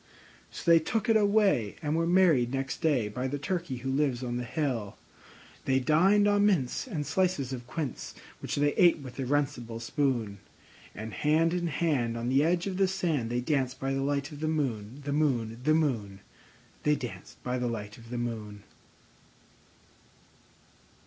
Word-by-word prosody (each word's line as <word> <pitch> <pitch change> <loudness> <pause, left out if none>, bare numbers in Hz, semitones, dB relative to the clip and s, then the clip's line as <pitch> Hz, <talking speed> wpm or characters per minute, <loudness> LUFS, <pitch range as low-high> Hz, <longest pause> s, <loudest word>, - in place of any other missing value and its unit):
So - - -9
they 165 - +8
took 220 +8 -2
it 225 - +5
away, 200 - +3
and 150 +1 0
were 165 0 +1
married 170 -9 +4
next 135 0 -3
day 140 -9 +2
By 125 +5 -3
the 145 +2 -3
Turkey 165 -1 -3
who 135 - 0
lives 135 -3 0
on 120 -1 -2
the 125 - -3
hill. 125 -6 -2 0.7
They 130 0 +3
dined 185 +9 +4
on 205 0 +3
mince 185 - +1
and 160 - -3
slices 175 -9 0
of 120 -1 -7
quince, 150 -2 -5 0.2
Which - - -4
they 145 0 +2
ate 175 -2 +5
with 135 -3 -10
a 135 - -1
runcible 130 -5 -1
spoon; 115 -5 -1 0.6
And 110 0 -6
hand 155 - +2
in 175 -1 -1
hand, 140 -8 0
on 115 +1 -2
the 135 +3 +4
edge 170 +2 +1
of 190 -2 -3
the 195 -1 +3
sand, 165 -10 -1
They 120 +1 -1
danced 130 -1 -1
by 135 0 -1
the 135 - -1
light 140 +2 -1
of 145 - -9
the 155 - -1
moon, 130 -5 -2
The 145 - -1
moon, 120 -7 0
The 155 +3 +4
moon, 110 -11 -1 0.6
They 150 0 +3
danced 105 -9 -8
by 125 0 -2
the 125 - -1
light 105 -2 -5
of 115 0 -14
the 120 - -4
moon. 110 -4 -5
135 Hz, 180 wpm, -29 LUFS, 120-160 Hz, 0.7 s, they